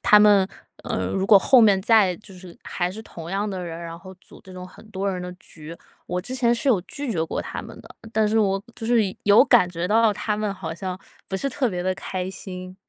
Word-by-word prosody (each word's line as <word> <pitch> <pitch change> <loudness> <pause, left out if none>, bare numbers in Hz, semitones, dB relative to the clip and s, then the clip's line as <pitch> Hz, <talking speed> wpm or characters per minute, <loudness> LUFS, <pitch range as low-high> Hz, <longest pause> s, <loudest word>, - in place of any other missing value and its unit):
他 210 - +7
们， 205 -2 +5 0.4
呃， - - -2
如 190 0 -1
果 200 0 +8
后 250 +6 +5
面 200 -4 +5
再 205 -5 +4
就 215 -2 -14
是 180 -1 -13
还 175 0 -2
是 220 +4 -8
同 170 -5 -10
样 200 +2 -1
的 185 -2 -4
人， 165 -1 -6
然 170 0 -8
后 190 +1 -12
组 185 - -15
这 190 - -14
种 185 0 -8
很 215 - -16
多 195 0 -2
人 185 - -4
的 180 0 -6
局 165 -2 -11 0.3
我 180 - -2
之 255 +5 -5
前 240 -2 +2
是 270 +3 +1
有 205 -7 +3
拒 260 +6 -5
绝 160 -3 0
过 160 - -3
他 - - -6
们 - - -11
的， - - -15 0.2
但 220 -1 +2
是 220 +1 +1
我 195 -2 +1
就 225 - -6
是 235 -3 +3 0.2
有 205 +5 +7
感 235 -10 +5
觉 175 0 -3
到 220 +3 +3
了 210 - +1
他 210 +1 -2
们 210 -1 -1
好 165 -4 -6
像 185 +1 -5 0.3
不 190 - -2
是 275 +8 -2
特 255 0 0
别 180 -3 -3
地 185 +1 0
开 185 0 -5
心。 185 -1 -8
195 Hz, 270 characters per minute, -23 LUFS, 180-215 Hz, 0.4 s, 果